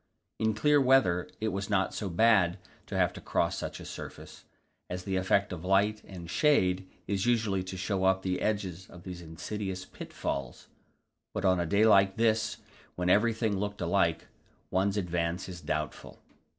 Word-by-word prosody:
In 110 0 +1
clear 150 +4 +4
weather 125 -10 +3
it 110 - 0
is 100 0 -3
not 95 -2 +1
so 100 - -3
bad 95 -1 +4 0.3
to - - -3
have - - +2
to - - -9
cross - - 0
such - - -5
a - - -9
surface, - - -9 0.4
as 90 0 -4
the 95 -1 -2
effect 95 +1 +1
of 85 -2 -7
light 100 +3 +2
and 90 -3 -9
shade 95 - +2 0.2
is 100 +2 -1
usually 110 -5 +2
to 95 0 -6
show 95 0 -1
up 95 0 +3
the 90 -1 -1
edges 95 -4 -2
of 85 - -13
these 90 -2 -7
insidious 95 +3 -5
pitfalls, 65 -3 -5 0.7
but - - -1
on 90 -1 +4
a 85 - -1
day 100 +5 +4
like 100 -2 +5
this, 110 -1 +2 0.4
when 90 0 +1
everything 110 -1 +2
looked 105 0 -3
alike, 85 -2 +1 0.5
one's 100 +2 +1
advance 85 -1 -1
is 90 -2 -8
doubtful. 75 -5 -4
95 Hz, 170 wpm, -30 LUFS, 90-105 Hz, 0.7 s, like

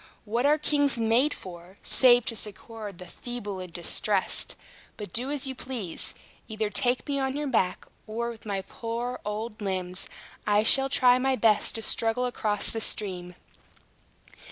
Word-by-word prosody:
What 235 +5 +1
are 300 +1 +5
kings 285 -3 +1
made 230 +6 +3
for, 180 -2 -10
save 245 -2 +5
to 230 - -3
succor 215 +1 -4
the 180 -1 -11
feeble 205 0 -6
and 180 -2 -7
distressed? 185 +3 +2 0.4
But 205 -5 -8
do 250 +3 0
as 290 -1 -1
you 265 - -3
please. 245 -9 -4 0.3
Either 215 -1 -2
take 245 +2 +2
me 280 -1 0
on 265 0 -1
your 295 +1 -2
back, 220 -9 0 0.2
or 235 +2 -2
with 225 - -12
my 200 -3 -3
poor 235 +4 -4
old 215 +1 -4
limbs 185 -2 -3 0.4
I 210 0 +4
shall 270 +4 +5
try 250 -2 +5
my 265 +1 +2
best 220 -4 +3
to 225 - -1
struggle 230 +3 +1
across 215 -4 0
the 225 - -2
stream." 180 -5 -2
225 Hz, 160 wpm, -27 LUFS, 200-250 Hz, 0.4 s, are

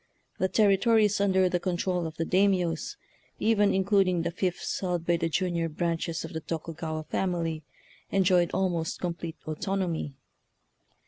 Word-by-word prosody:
The 190 - +2
territories 210 +1 +3
under 190 -2 +3
the 180 0 0
control 180 -1 -1
of 160 - -8
the 165 - -1
Daimiyos, 185 -4 +1 0.4
even 210 -2 +3
includ 195 0 +3
ing 175 -2 +1
the - - -1
fiefs 180 0 -2
held 175 -3 -2
by 170 0 +2
the 165 0 -1
junior 170 -1 0
branches 165 0 -2
of - - -9
the 160 - -4
Tokugawa 160 0 -4
family, 165 -2 -2 0.5
enjoyed 180 -3 +3
almost 175 -4 -1
complete 170 -2 -4
autonomy. 165 -2 -2
175 Hz, 140 wpm, -28 LUFS, 165-190 Hz, 0.5 s, territories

